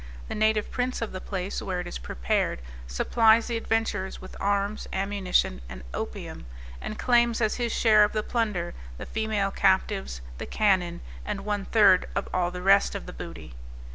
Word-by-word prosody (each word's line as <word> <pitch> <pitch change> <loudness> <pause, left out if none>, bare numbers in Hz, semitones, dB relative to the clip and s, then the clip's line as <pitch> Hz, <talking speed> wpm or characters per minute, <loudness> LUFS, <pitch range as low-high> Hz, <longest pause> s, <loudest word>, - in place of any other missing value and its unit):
The - - -3
native 215 0 +1
prince 250 0 -1
of 230 - -4
the 185 - -6
place 190 -1 -4
where 185 -2 -2
it 180 - -4
is 175 - -6
prepared, 60 0 -1 0.2
supplies 220 - +4
the 240 - -2
adventurers 225 -4 -1
with 185 - -11
arms, 200 +1 0
ammunition 190 - 0
and 60 +1 -9
opium, 60 -1 -6 0.3
and 215 - -5
claims 240 -2 +3
as 220 -2 +1
his 240 -2 -1
share 215 -2 +5
of 210 - +2
the 215 -1 -1
plunder, 210 -8 -1 0.2
the - - -6
female 215 -3 -1
captives, 65 - +1 0.2
the - - -5
cannon, 185 -5 +1 0.2
and 205 -1 -4
one 205 -2 -1
third 205 -5 +5
of 200 - -1
all 180 -1 +1
the 180 0 -7
rest 195 +1 +4
of - - -5
the - - -8
booty. - - -8
200 Hz, 175 wpm, -27 LUFS, 180-220 Hz, 0.3 s, share